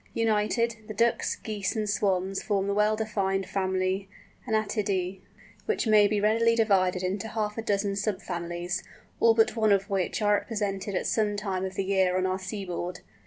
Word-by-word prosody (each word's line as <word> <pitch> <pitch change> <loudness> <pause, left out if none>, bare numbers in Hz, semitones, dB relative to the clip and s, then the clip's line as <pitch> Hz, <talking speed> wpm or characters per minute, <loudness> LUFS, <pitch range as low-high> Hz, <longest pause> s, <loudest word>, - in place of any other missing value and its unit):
United, 225 +1 +1
the 215 - -6
Ducks, 230 +2 +1
Geese, 210 0 -3
and 215 -1 -1
Swans 195 -2 0
form 200 -2 0
the 200 - 0
well 210 +1 +3
defined 195 -3 -1
family 190 0 -1 0.4
Anatidæ, 200 -4 -1 0.5
which 440 - 0
may 215 -2 +6
be 210 0 0
readily 230 +2 +3
divided 190 -5 +2
into 190 +3 -2
half 215 -1 -2
a 225 - -3
dozen 200 -2 0
sub 200 -1 -1
families, 175 0 -4 0.4
all 230 -1 +5
but 225 +1 +3
one 220 -2 +3
of 200 +1 +2
which 190 -2 0
are 210 -1 +3
represented 200 -3 -3
at - - -1
some 210 -2 +1
time 195 -3 -2
of 190 0 -6
the 195 - -1
year 190 -1 +2
on 185 - +1
our 185 0 -1
seaboard. 185 -2 -5
200 Hz, 175 wpm, -27 LUFS, 190-215 Hz, 0.5 s, may